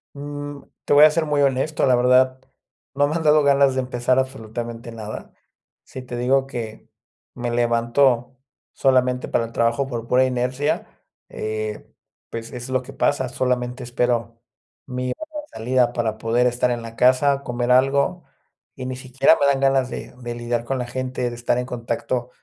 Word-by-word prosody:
Mm, 145 0 -7 0.2
te - - +2
voy 145 +1 +8
a 155 - +8
ser 160 +1 0
muy 145 -1 +1
honesto. 140 +2 +1
La 130 -2 +4
verdad, 130 +1 +4 0.5
no 145 +1 +3
me 155 - -2
han 165 - -1
dado 150 -1 +5
ganas 140 -1 +4
de 130 - +1
empezar 125 0 0
absolutamente 120 -2 -4
nada. 110 -1 -8 0.5
Sí 130 - -9
te 125 -1 -7
digo 130 +2 +2
que 115 -5 -7 0.5
me 120 0 -3
levanto 120 +2 +2 0.3
solamente 125 -1 +2
para 115 - +1
el 115 - -10
trabajo 115 +4 +1
por 120 -3 -5
pura 125 +2 +4
inercia, 130 +2 -1 0.4
eh, 110 0 -5 0.4
pues 115 0 -7
es 125 0 -7
lo 130 -1 +1
que 125 - -11
pasa. 130 - +1
Solamente 125 0 -2
espero 120 -1 -1 0.4
mi 125 -1 -3
hora 310 -1 -7
de 295 - -17
salida 125 +1 +2
para 115 -3 -2
poder 120 +3 +2
estar 125 0 +1
en 120 -1 -2
la 115 0 -9
casa, 130 +3 +3
comer 120 0 -1
algo, 140 +6 +3 0.5
y 130 - -7
ni 130 0 -4
siquiera 130 +4 +3
me - - +2
dan 140 -1 +2
ganas 135 -1 +2
de - - -7
de 120 -1 -4
lidiar 120 0 -2
con 130 +3 -2
la 125 -1 -3
gente, 130 0 -3
de 120 - -7
estar 120 0 0
en 125 - -1
contacto 120 0 -3
125 Hz, 180 wpm, -22 LUFS, 120-135 Hz, 0.5 s, voy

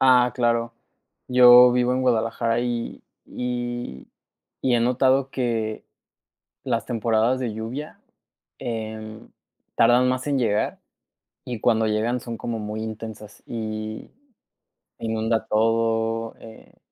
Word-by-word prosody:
Ah, 125 -2 +5
claro, 115 -1 +1 0.6
yo 125 0 +8
vivo 125 0 +2
en 130 - 0
Guadalajara, 115 -1 +1
y 120 -1 -3 0.2
y 120 - -5 0.5
y 125 -2 +2
he 120 - +3
notado 130 +2 +2
que 115 -4 -2 0.8
las - - -1
temporadas 115 +2 +1
de 120 -3 -2
lluvia, 125 +7 -6 0.6
eh, 110 -1 -5 0.5
tardan 120 +2 +4
más 130 +1 -1
en 140 -2 +1
llegar, 110 -4 0 0.6
y 120 -4 -5
cuando 110 -2 +2
llegan 110 +3 0
son 115 -1 -6
como 115 0 -4
muy 105 +1 -5
intensas, 110 -1 -8
y 110 -1 -5 0.9
inunda 110 0 -1
todo, 115 +1 0
eh 110 -1 -14
115 Hz, 115 wpm, -24 LUFS, 110-125 Hz, 0.9 s, yo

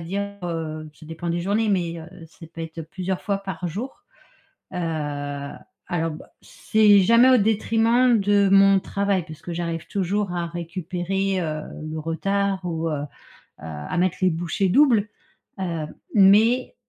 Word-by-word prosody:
dire, 200 +4 -4
heu 155 -2 -4
ça 155 - -15
dépend 165 +2 -6
des 170 +1 -1
journées 205 +5 0
mais, 175 -4 0
heu, 160 +1 -12
ça 165 +1 -14
peut 165 - -8
être 165 0 -6
plusieurs 185 +3 -4
fois 200 -1 -1
par 190 -3 -5
jour, 215 +11 -7 0.7
heu, - - -3 1.1
alors, 165 -2 0
bah, 155 - -11
c'est 210 -2 +3
jamais 230 +6 +6
au 255 - +6
détriment 225 +3 +3
de 200 0 +3
mon 195 0 +6
travail, 200 -2 -1
parce 155 -2 -11
que 175 - -6
j'arrive 170 -1 -3
toujours 200 0 -1
à 175 -1 -1
récupérer, 180 +3 -2
heu, 155 -2 -3 0.3
le 160 - -4
retard 195 +5 -1
ou, 165 -2 -2
heu, - - -2
heu, - - -4 0.5
à 75 -1 -6
mettre 185 -1 +1
les 185 -1 +4
bouchées 170 +4 -1
doubles, 230 -3 +4 0.5
heu, 165 -5 -3 0.3
mais, 220 - +4
185 Hz, 155 wpm, -23 LUFS, 165-200 Hz, 1.1 s, jamais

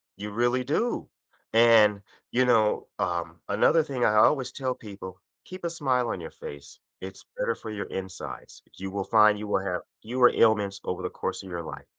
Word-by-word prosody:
You 105 +1 -6
really 120 +3 +1
do. 160 - -1 0.4
And, 110 -3 +6 0.3
you 130 +1 +3
know, 110 -3 +2
um, - - -2
another 165 -1 +4
thing 135 -5 -1
I 105 - +3
always 130 +3 +4
tell 130 -2 -2
people, 100 -4 -10 0.3
keep 185 -1 -10
a - - 0
smile 130 -7 0
on 90 - -3
your 80 - -8
face. 70 -1 -10 0.2
It's 95 +1 -9
better - - 0
for 110 - -9
your 100 -2 -4
insides. 95 -1 -8
You 95 0 -5
will 100 -1 -2
find 105 -1 +5
you 105 - -6
will 105 - +1
have 90 -2 -2 0.2
fewer 125 +2 +4
ailments 105 -3 +3
over 90 0 -3
the 90 - -2
course - - -4
of 95 - -10
your 85 -1 -4
life. - - -9
110 Hz, 190 wpm, -27 LUFS, 95-125 Hz, 0.4 s, And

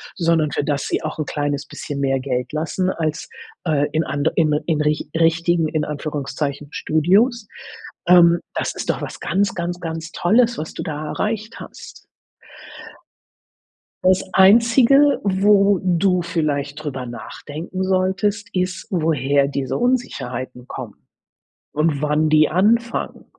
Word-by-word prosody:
sondern 165 -4 +1
für - - -1
das 145 0 -1
sie - - -1
auch 155 - -4
'n 155 - -1
kleines 145 0 -2
bisschen 145 0 -6
mehr 135 -1 +1
Geld 125 -2 -3
lassen 165 +4 -1
als, 160 -3 -3 0.4
äh, 150 -3 +2
in 160 +1 +1
and 145 +1 0
in 155 -3 +2
in 155 -3 +1
rich 150 0 0
richtigen, 165 0 +2
in 155 -1 -1
Anführungszeichen, 145 -1 -4
Studios, 205 - +2 0.6
ähm. 170 -1 +6
Das - - -2
ist - - -5
doch - - 0
was - - -6
ganz, 200 +1 0
ganz, 175 0 -3
ganz 165 -1 -5
Tolles, 230 +8 +2
was 160 - -5
du - - -5
da 155 0 -5
erreicht 215 +6 -3
hast. - - -12 2.0
Das 185 0 +3
Einzige, 235 +8 +5
wo 200 0 +3
du 180 0 +2
vielleicht 150 -3 -2
drüber 135 -4 -4
nachdenken 155 +9 -6
solltest, 190 +2 0
ist, 180 0 -2
woher 145 -5 +1
diese 140 -1 -3
Unsicherheiten 130 - -2
kommen 120 -6 -9 0.7
und 150 -1 0
wann 150 +1 +2
die 155 0 +4
anfangen. 230 +7 0
165 Hz, 135 wpm, -20 LUFS, 145-190 Hz, 2.0 s, ähm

